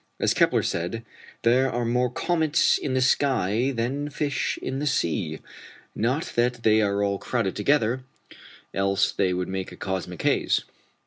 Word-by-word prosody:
As - - +2
Kepler - - +3
said, 100 +7 -3 0.4
there 125 +3 +4
are 120 0 -1
more 125 +2 +1
"comets" 160 +4 +2
in 135 -3 -2
the 130 - +2
sky 130 -3 +2
than 135 +4 -2
fish 145 -1 -2
in 135 +1 -4
the 150 - -1
sea. 85 - -1 0.5
Not 125 +8 -1
that 120 0 +1
they 110 0 +4
are 100 -1 +1
at - - +3
all 100 -1 -1
crowded 115 -7 -1
together, 125 +1 +1 0.7
else 100 0 +1
they 95 -2 +1
would 90 0 -2
make 95 -1 -4
a - - -9
cosmic 95 -2 -4
haze. - - +2
115 Hz, 165 wpm, -25 LUFS, 100-130 Hz, 0.7 s, there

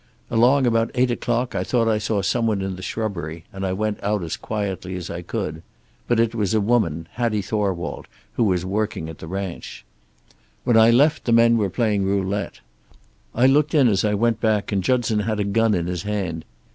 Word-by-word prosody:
Along 125 +4 +4
about 115 -1 +2
eight 125 0 +2
o'clock 120 +1 -1
I - - -1
thought 115 -2 +1
I 110 -1 +2
saw 105 -2 -1
some 115 +4 +1
one 105 -3 0
in 95 -1 -3
the 90 - -9
shrubbery, 85 -6 -4
and 95 0 -6
I 95 - 0
went 105 +2 -2
out 105 -2 0
as 80 - -3
quietly 95 -4 -4
as 90 -2 -6
I 85 - -5
could. 80 -2 -4 0.5
But 120 -1 +2
it 115 0 +2
was 105 -2 0
a - - +4
woman, 100 -8 0
Hattie 115 -4 -1
Thorwald, 95 -4 -2 0.3
who 115 - +1
was 90 -3 +1
working 100 -4 -2
at 80 - -10
the 80 - -8
ranch. 95 -7 -6 0.8
"When 120 - +2
I 110 0 +7
left 140 +6 +3
the 120 - 0
men 115 0 +5
were 105 -4 +1
playing 105 -1 0
roulette. 100 +1 -2 0.7
I 120 - +3
looked 145 +3 +3
in 140 -4 +5
as 100 -4 +2
I 105 -1 +1
went 115 +2 +1
back, 110 -2 +1
and 100 -2 0
Judson 115 -1 +1
had 110 0 -1
a - - +2
gun 105 +2 +2
in 85 -2 -1
his 90 -1 -3
hand. 95 -6 -3
105 Hz, 210 wpm, -22 LUFS, 95-115 Hz, 0.8 s, I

